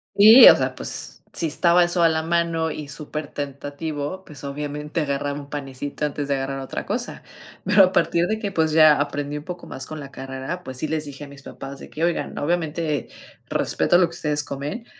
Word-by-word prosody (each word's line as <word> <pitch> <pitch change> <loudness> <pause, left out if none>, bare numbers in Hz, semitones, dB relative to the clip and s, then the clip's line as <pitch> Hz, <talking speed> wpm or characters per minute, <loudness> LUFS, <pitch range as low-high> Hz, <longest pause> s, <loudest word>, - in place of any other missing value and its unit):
Sí, 220 +5 +10
o - - +8
sea, - - -1
pues, - - -5
si 170 - -1
estaba 170 +3 +4
eso 175 0 +1
a 165 - +6
la 160 0 0
mano 165 -1 0
y 150 -1 -6
supertentativo, 145 +2 -5
pues, 145 -2 -11
obviamente 150 +3 -4
agarraba 140 0 -2
1 140 0 -11
panecito 140 +1 -4
antes 145 -1 -3
de 140 - +1
agarrar 135 0 -3
otra 135 - -5
cosa. 240 +4 -3 0.4
Pero 195 - +6
a 185 - +3
partir 170 -2 +2
de 220 +2 -1
que, 205 -3 -3
pues, 160 -4 +1
ya 155 -2 +6
aprendí 145 0 -2
un 150 - -7
poco 180 +1 -8
más 130 - -4
con 155 -1 -7
la 140 - -8
carrera, 135 +6 -6
pues 130 -1 -7
sí 155 - -2
les 155 0 -2
dije 145 0 -8
a - - -12
mis 140 0 -13
papás 135 -1 -9
de - - -11
que: 160 - -5
"Oigan, 170 0 -1
obviamente 155 -3 -1 0.4
respeto 175 - +2
lo 180 - +5
que 170 - -10
ustedes 150 -3 -1
comen, 145 - -5
150 Hz, 210 wpm, -23 LUFS, 140-170 Hz, 0.4 s, Sí